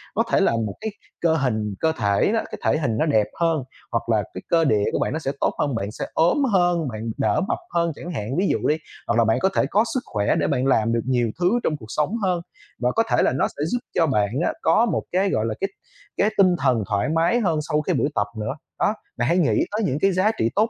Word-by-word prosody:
Có - - +3
thể - - +4
là - - +3
một 110 -3 -1
cái 220 - -3 0.3
cơ 165 -1 +3
hình 110 -8 -1
cơ 160 - +2
thể 100 -2 +2
á, 225 - 0
cái - - -6
thể - - +3
hình 115 -8 -1
nó 155 - +2
đẹp 110 -9 +2
hơn, 165 -4 +1 0.3
hoặc 115 0 -2
là 110 -3 +2
cái 95 - -6
cơ 165 -1 +4
địa 105 -7 +2
của - - -1
bạn - - -1
nó 160 - -2
sẽ 135 -4 -2
tốt - - +1
hơn, 140 -4 0
bạn 105 -2 -3
sẽ - - -5
ốm 175 - +3
hơn, 175 -4 +2
bạn 110 -1 -4
đỡ - - +1
mập - - 0 0.2
hơn 170 -1 +1
chẳng 175 +4 -7
hạn, 130 +1 -3
ví 195 - +2
dụ - - 0
đi. 150 - +2 0.3
Hoặc 115 - +1
là 115 - +4
bạn 110 - +2
có 190 - +2
thể - - +3
có 210 - +3
sức 260 - +1
khỏe 100 -1 0
để - - +1
bạn 125 - 0
làm 115 -3 +2
được 115 - +1
nhiều 120 -3 +1
thứ 180 +1 +3
trong 155 - 0
cuộc 110 - -11
sống 150 - -1
hơn 180 -3 +1 0.4
và 125 0 +1
có 225 - +4
thể - - +3
là - - +3
nó 135 - +2
sẽ 145 - -5
giúp 245 - +1 0.2
cho 165 - +3
bạn 105 -7 +1 0.2
á - - 0
có 165 +8 +4
một 235 - -1
cái, 190 +2 +2
gọi 110 -11 0
là, 115 - -1
cái 195 - 0 0.5
cái 205 - +3
tinh 185 -2 +5
thần 125 -5 +2
thoải 100 +3 0
mái 165 +9 +2
hơn 170 -9 +1
sau 150 - +2
cái - - -1
buổi - - +1
tập 105 - +1
nữa. 110 +5 -2 0.3
Đó. - - +2 0.2
Bạn 120 0 0
hãy 170 +4 +2
nghĩ 165 -5 +2
tới 210 +2 -1
những 140 -6 0
cái 195 - +4
giá 185 +4 +2
trị 115 - +2
tốt 215 +3 +3
150 Hz, 275 wpm, -23 LUFS, 115-175 Hz, 0.5 s, tinh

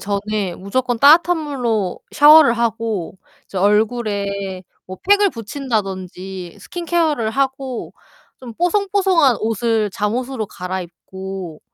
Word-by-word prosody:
전에 205 -2 -2
무조건 245 +5 -2
따뜻한 330 +7 +6
물로 240 - -2
샤워를 295 -3 +7
하고 225 -6 -2 0.3
이제 190 - -6
얼굴에 200 -2 0 0.2
뭐 185 - -8
팩을 405 0 +5
붙인다든지 195 - -5
스킨 350 -1 -7
케어를 315 -10 +1
하고 265 -1 -3 0.5
좀 240 -3 -10
뽀송뽀송한 365 - +2
옷을 225 -1 0
잠옷으로 225 +4 -2
갈아입고 185 -1 -7
225 Hz, 260 characters per minute, -19 LUFS, 195-275 Hz, 0.5 s, 샤워를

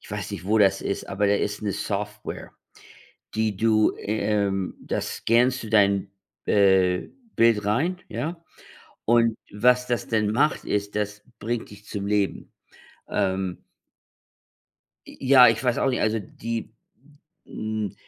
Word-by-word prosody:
ich - - -15
weiß - - -4
nicht, - - -6
wo 110 +3 +2
das 95 -1 +4
ist, 100 - -3
aber 100 +1 0
da 100 - +3
ist 105 +1 -2
'ne 100 -2 -1
Software, 105 +1 -5 0.8
die 110 -2 0
du, 110 0 +3
ähm 100 -2 -1
da - - -2
scannst 125 +2 +1
du 110 - -7
dein, 100 -2 +3 0.4
äh, 95 -3 +3 0.3
Bild 115 -3 +3
rein, 160 - 0
ja? 165 +2 -4 0.6
Und 115 -1 +3 0.2
was 125 +4 +3
das 120 -4 -2
denn 110 -2 +1
macht, 150 +7 +1
ist, 100 0 -2
das 105 0 -3 0.2
bringt 115 +2 -3
dich 105 +1 -14
zum 100 -2 -4
Leben. 100 -1 -1 0.6
Ähm. 95 -2 -2 1.4
J - - -12
ja, 130 -2 +7
ich 115 +2 +1
weiß 125 -2 +1
auch - - +2
nicht, 125 - 0
also 110 +1 +1
die, 115 +3 -6 0.7
hm 110 -2 -4
105 Hz, 145 wpm, -25 LUFS, 100-115 Hz, 1.4 s, ja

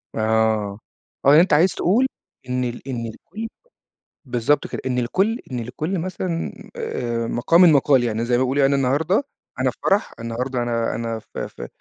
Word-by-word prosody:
آه، 110 -2 +1 0.5
آه - - +7
يعني 150 +3 +8
أنتَ 180 - +2
عايز 175 +5 +5
تقول 230 +9 +3 0.4
إن 125 0 0
ال 120 +2 -5
إن 120 -3 -3
لكل 220 - -8 0.8
بالضبط 125 +3 +1
كده، - - -5
إن 125 -1 0
لكل 195 - +1
إن 125 - -2
لكل 155 +10 -3
مثلًا 180 -1 -3 0.2
آآ، 115 -1 -2
مَقامٍ 155 +10 +3
مَقال، 135 -3 +4
يعني 115 0 -1
زي 120 - -1
ما 130 - +2
بيقولوا 135 +2 +1
يعني 135 +1 +4
أنا 135 - +1
النهاردة 160 - +2 0.4
أنا - - +2
في - - -22
فَرَح، 200 +3 +2
النهاردة 120 +2 -2
أنا 115 -1 -1
أنا 115 -1 -3
في - - -6
في - - -9
125 Hz, 180 wpm, -22 LUFS, 115-160 Hz, 0.8 s, يعني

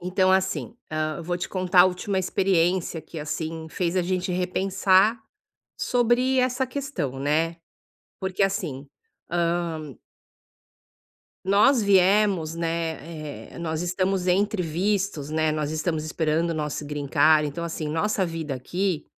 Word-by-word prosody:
Então, 185 +1 +2
assim, 190 +4 0 0.2
hã, 155 +1 -2
vou 175 +2 -2
te 180 - -4
contar 185 -1 +3
a 180 - +9
última 190 +2 -2
experiência 180 -2 +1
que, 160 +1 -9
assim, 160 +2 -4
fez 175 +1 -2
a 185 - +3
gente 185 +1 -1
repensar 190 +4 +2 0.6
sobre 250 +2 +2
essa 255 +1 +1
questão, 245 - -4
né. 160 +4 0 0.6
Porque, 190 +1 -1
assim, 165 -8 -1 0.4
hã 170 -5 -1 1.5
nós 215 +5 +5
viemos, 195 -4 +3
né, 165 -2 -4
eh, - - -10
nós 160 -1 -2
estamos 185 +1 0
entre 195 +1 +2
vistos, 180 -2 -1
né, 155 0 +1
nós 150 -1 -2
estamos 155 0 -1
esperando 160 +1 0
o 165 - -2
nosso 150 -1 -3
green 145 -1 -4
card, 150 +3 +4
então, 145 +4 -5
assim, 165 -2 -4
nossa 190 +6 0
vida 165 -5 -4
aqui 175 +6 -2
175 Hz, 135 wpm, -25 LUFS, 155-190 Hz, 1.5 s, a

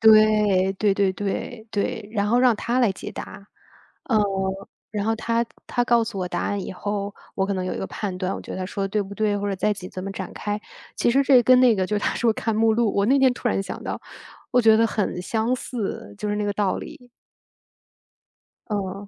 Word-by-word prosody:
对， 215 -3 +5
对 200 0 +2
对 195 -1 +2
对， 215 +4 -4
对， 205 0 -2
然 205 -2 0
后 240 +3 +3
让 250 -2 +5
它 235 +4 -1
来 235 -6 +3
解 - - -7
答。 200 +1 -9 0.6
呃， 225 -4 +2 0.7
然 205 -1 -2
后 225 - +2
它 230 +1 0 0.2
它 245 -1 0
告 235 -1 +4
诉 225 -3 -6
我 185 - -1
答 175 -1 -2
案 205 -1 -1
以 - - -5
后， 205 +1 -3 0.2
我 190 - +1
可 200 - -1
能 185 -1 -2
有 185 - -2
一 - - -4
个 190 - -3
判 195 -4 -4
断， 185 0 -1
我 - - -6
觉 - - -8
得 - - -5
它 185 - -3
说 195 +1 -3
得 - - -2
对 210 +1 0
不 200 0 -9
对， 210 -1 +1
或 205 0 -2
者 195 - -1
在 210 - +1
一 210 - +1
起 185 -2 -8
怎 185 - -7
么 195 - -4
展 190 -1 -6
开。 210 0 -3 0.4
其 235 - +2
实 275 +3 +4
这 260 -3 +6
跟 255 +2 +6
那 245 -3 +6
个 190 -2 0
就 210 +1 0
他 - - -1
说 230 -1 +2
看 225 0 -2
目 225 0 +4
录 230 -2 +1
我 200 - +2
那 270 +4 +4
天 265 -2 +5
突 240 - -2
然 195 - 0
想 - - -7
到， - - -4 0.5
我 250 - +5
觉 220 -1 +7
得 230 +1 +4
很 200 -5 -2
相 225 +5 0
似， 215 - -5
就 210 - -3
是 205 - 0
那 210 - -1
个 205 - 0
道 200 -2 0
理。 250 -5 -10 1.6
嗯。 200 -1 -3
210 Hz, 260 characters per minute, -24 LUFS, 195-230 Hz, 1.6 s, 觉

